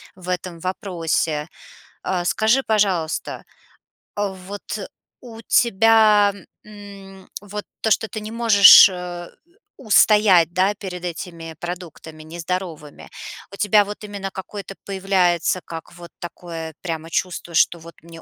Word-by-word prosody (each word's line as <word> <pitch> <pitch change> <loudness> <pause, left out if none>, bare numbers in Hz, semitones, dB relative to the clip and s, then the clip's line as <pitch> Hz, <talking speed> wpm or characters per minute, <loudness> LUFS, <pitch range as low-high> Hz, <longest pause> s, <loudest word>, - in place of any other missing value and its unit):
в 180 -1 -14
этом 180 -2 -4
вопросе. 165 -5 -2 0.6
Э, 180 -2 -1
скажи, 220 +8 +2
пожалуйста, 195 -7 -1 0.7
э, 205 -2 -1
вот 205 0 -8 0.6
у 230 -2 -11
тебя, 215 -2 +4 0.3
мм, 200 -2 -13
вот 205 0 -7 0.2
то, 220 - 0
что 220 +1 +2
ты 215 - -6
не 215 +1 -8
можешь, 220 -5 +8
э, 180 -2 -7 0.5
устоять, 205 - +4
да, 190 +3 +2
перед 185 -3 -8
этими 165 -1 -7
продуктами 170 -3 -8
нездоровыми, 165 -2 -6 0.4
у 200 - -10
тебя 210 0 +4
вот 205 +1 -8
именно 200 -2 -6
какое-то 195 +1 -8
появляется, 185 -3 +1
как, 165 -1 -9
вот 170 -1 -12
такое 165 -2 -8
прямо 165 -1 -5
чувство, 175 0 -3
что 170 +1 +3
вот: 165 0 -13
"Мне 165 0 -13
185 Hz, 125 wpm, -21 LUFS, 170-205 Hz, 0.7 s, можешь